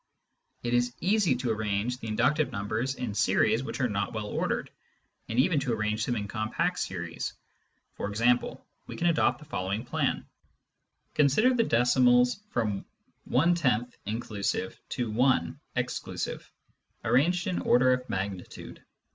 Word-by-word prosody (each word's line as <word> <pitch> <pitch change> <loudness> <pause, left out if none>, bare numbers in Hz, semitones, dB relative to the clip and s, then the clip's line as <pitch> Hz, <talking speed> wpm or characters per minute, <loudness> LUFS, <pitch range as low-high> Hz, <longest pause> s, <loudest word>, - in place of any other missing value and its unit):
It 120 0 -1
is 120 0 +1
easy 190 -6 +3
to 125 -1 -1
arrange 110 +3 -1
the 115 - -7
inductive 130 +8 +2
numbers 110 +6 -2
in 120 -5 -4
series 110 +2 +3
which 135 - -5
are 125 - +3
not 100 -3 -2
well 110 -1 -3
ordered, 105 - -2 0.6
and 115 - -3
even 150 +3 +4
to 130 -3 -1
arrange 110 0 -1
them 120 - 0
in 105 -2 -3
compact 110 0 -1
series. - - -4 0.6
For - - -4
example, 120 +4 +1 0.2
we - - -7
can 175 - -2
adopt 170 -2 +3
the 150 - -14
following 100 -3 -3
plan: - - -1 0.9
consider 155 - +4
the 245 - +3
decimals 125 - +4
from 105 - -1 0.5
"I 135 -6 +3 0.2
(inclusive) 105 -4 -2
to 120 -4 -2
1 110 -8 +2 0.2
(exclusive), - - -3 0.5
arranged 175 +6 +3
in 185 -3 -1
order 130 +1 +4
of 125 0 -3
magnitude. 95 -1 -5
120 Hz, 140 wpm, -28 LUFS, 105-135 Hz, 0.9 s, even